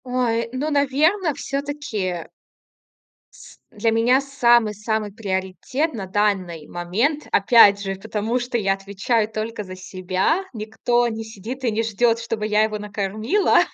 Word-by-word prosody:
Ой, 240 -2 0
ну, 280 +4 -2
наверно, 300 +5 +2
всё-таки 275 - -3 1.1
с - - -15
для 225 0 0
меня 235 +4 +4
самый-самый 220 -6 +1
приоритет 200 - -2
на 200 -4 -5
данный 190 -5 -1
момент, 220 - -1
опять 200 -1 +6
же, 195 -1 -3
потому 215 +5 -2
что 245 0 -2
я 195 -3 +1
отвечаю 200 +3 -1
только 220 0 -4
за 185 -1 -9
себя. 185 - -1
Никто 240 +2 0
не 225 -1 -4
сидит 220 +4 -8
и 235 - +1
не 215 +1 0
ждет, 230 +1 +1
чтобы 225 -2 -3
я 215 0 +3
его 215 -1 -1
накормила, 210 - +1
220 Hz, 135 wpm, -22 LUFS, 200-250 Hz, 1.1 s, опять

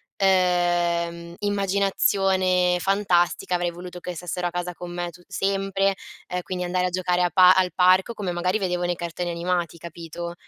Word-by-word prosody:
ehm, 175 -2 +1
immaginazione 195 -2 +1
fantastica 185 -2 +1
avrei 175 0 0
voluto 180 +1 -9
che 180 0 -6
stessero 175 +1 -3
a - - -2
casa 175 +1 -4
con 175 0 -8
me 175 0 -3
tut 175 +1 -18
sempre, 195 0 0 0.3
ehm, 180 0 -3
quindi 180 0 -4
andare 180 +1 0
a - - -2
giocare 180 0 0
a 175 - +2
pa 180 +1 +7
al 185 -1 +2
parco 185 +4 +4
come 195 -4 -3
magari 180 +3 0
vedevo 180 -2 -1
nei 175 0 0
cartoni 175 +1 -4
animati, 170 0 -2
capito? 170 +1 -7
180 Hz, 165 wpm, -24 LUFS, 175-185 Hz, 0.3 s, pa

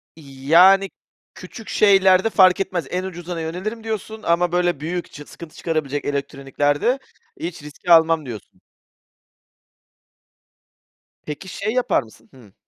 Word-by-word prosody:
"İii, 135 -4 -13
yani, 190 +5 +6 0.5
küçük 225 - -11
şeylerde 195 0 +4
fark 185 -4 +5
etmez. 185 -6 -3
En 180 +1 -3
ucuzuna 175 -2 -6
yönelirim." 190 +8 -5
diyorsun. 220 0 -6
"Ama, 175 +1 +1
böyle, 175 -3 0
büyük, 170 +3 -5
çıks 145 0 -12
sıkıntı 165 -2 -12
çıkarabilecek 150 -4 -3
elektroniklerde 145 - -1 0.4
hiç 170 -3 -6
riski 150 +4 -5
almam." 165 -2 +5
diyorsun. 115 -5 -10 2.6
Peki, 150 +5 -7
şey 200 +4 -4
yapar 250 - +1
mısın? 110 0 -20
Hıı. 115 -7 -18
170 Hz, 125 wpm, -21 LUFS, 145-190 Hz, 2.6 s, yani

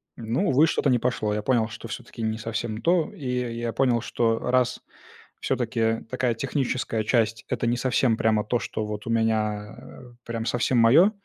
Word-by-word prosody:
Ну, 115 +2 -1
увы, 145 +5 +5
что-то 145 - +1
не 125 -2 +3
пошло. 115 -4 -1
Я 105 - -1
понял, 115 -2 +2
что 115 0 -9
всё-таки 120 +1 -8
не 110 0 -1
совсем 110 0 -4
то. 170 0 +2
И 165 -9 -10
я 125 -1 -1
и 115 - -6
я 115 -1 -3
понял, 125 -3 +2
что 115 -1 0
раз 125 0 +1 0.6
всё-таки 115 -2 0
такая 125 -1 0
техническая 125 -3 -1
часть- 115 -1 +1
это 120 - -1
не 120 - +2
совсем 125 -2 +2
прямо 110 -2 +2
то, 120 +2 0
что 110 +1 -4
вот 105 0 -6
у - - -3
меня, 110 -2 0
э, - - -13 0.2
прям 115 -1 -4
совсем 120 +1 +1
моё, 140 - +6
115 Hz, 190 wpm, -25 LUFS, 110-125 Hz, 0.6 s, моё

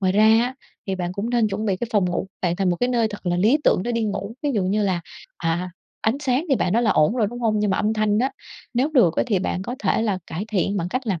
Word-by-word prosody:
Ngoài 185 -1 +2
ra 210 +2 +4 0.2
á 255 +1 -4 0.3
thì 195 - -1
bạn 180 -1 -3
cũng 205 +5 -3
nên 235 -3 +2
chuẩn 210 +2 -3
bị 190 -2 +1
cái 235 +4 -4
phòng 205 -3 +3
ngủ 175 - -2 0.2
bạn 175 -1 +1
thành 190 -2 +1
một 175 - 0
cái 245 - 0
nơi 235 -3 +2
thật 205 -3 -9
là 175 - +1
lý 220 +11 +4
tưởng 185 - +3
để 240 - -2
đi 230 -1 0
ngủ, 200 +1 -3
ví 290 - +1
dụ 200 - +1
như 205 +3 +1
là, 185 -3 0 0.4
à, 175 +2 -2 0.3
ánh 220 +5 +1
sáng 265 +3 +1
thì 270 - +4
bạn 180 - 0
nói 235 +3 +3
là 220 - +3
ổn 155 +9 +3
rồi, 220 -4 +2
đúng 245 0 -7
hông? 215 -2 +1
Nhưng 210 -1 +1
mà 190 - +1
âm 215 +1 +1
thanh 215 -1 +1
á, 265 +3 +1 0.4
nếu 260 +5 +2
được 180 -11 +4
ấy - - +2
thì 200 -4 +2
bạn 185 0 -2
có 245 - -4
thể 210 +2 +1
là 200 -4 0
cải 175 +6 -4
thiện 200 -1 0
bằng 175 -1 -1
cách 255 +3 -3
làm 185 -6 -1
210 Hz, 305 wpm, -23 LUFS, 185-235 Hz, 0.4 s, ra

